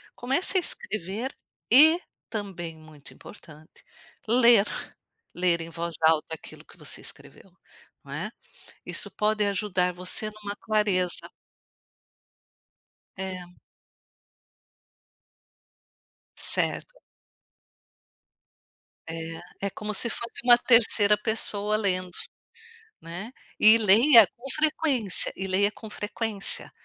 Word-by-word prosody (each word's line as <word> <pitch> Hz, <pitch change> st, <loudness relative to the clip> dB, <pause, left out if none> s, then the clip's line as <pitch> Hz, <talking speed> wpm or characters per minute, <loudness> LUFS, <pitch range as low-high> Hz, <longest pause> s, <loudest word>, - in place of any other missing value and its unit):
Comece 275 Hz, +10 st, +1 dB
a -, -, +3 dB
escrever 215 Hz, -, -3 dB, 0.4 s
e, 315 Hz, +7 st, +7 dB, 0.3 s
também 175 Hz, -6 st, -7 dB
muito 155 Hz, -2 st, -16 dB
importante, 155 Hz, -4 st, -16 dB, 0.4 s
ler, 235 Hz, -3 st, +5 dB, 0.7 s
ler 175 Hz, -1 st, +2 dB
em 165 Hz, -, -8 dB
voz 170 Hz, 0 st, -3 dB
alta 160 Hz, 0 st, +1 dB
aquilo -, -, -14 dB
que -, -, -20 dB
você -, -, -5 dB
escreveu, -, -, -9 dB, 0.5 s
não -, -, -10 dB
é, -, -, -4 dB, 0.6 s
isso -, -, +1 dB
pode 215 Hz, 0 st, -1 dB
ajudar 185 Hz, -2 st, -1 dB
você 180 Hz, +4 st, -2 dB
numa 205 Hz, -1 st, -9 dB
clareza. 205 Hz, -5 st, -1 dB, 1.9 s
É. 185 Hz, -2 st, -8 dB, 2.8 s
Certo. -, -, -1 dB, 2.1 s
É, 165 Hz, +4 st, -7 dB
é -, -, -3 dB
como 210 Hz, +2 st, -6 dB
se 235 Hz, +4 st, +5 dB
fosse 235 Hz, +5 st, -4 dB
uma 240 Hz, -1 st, +7 dB
terceira 220 Hz, -4 st, +4 dB
pessoa 210 Hz, -1 st, +2 dB
lendo, 185 Hz, -3 st, -2 dB, 0.9 s
né, 175 Hz, +8 st, -9 dB, 0.3 s
e 215 Hz, +2 st, +7 dB
leia 225 Hz, +2 st, +6 dB
com 245 Hz, -, -17 dB
frequência 290 Hz, -, +1 dB
e 190 Hz, 0 st, -5 dB
leia 200 Hz, +2 st, +1 dB
com 220 Hz, 0 st, -12 dB
frequência. 210 Hz, -1 st, -3 dB
205 Hz, 100 wpm, -25 LUFS, 180-230 Hz, 2.8 s, e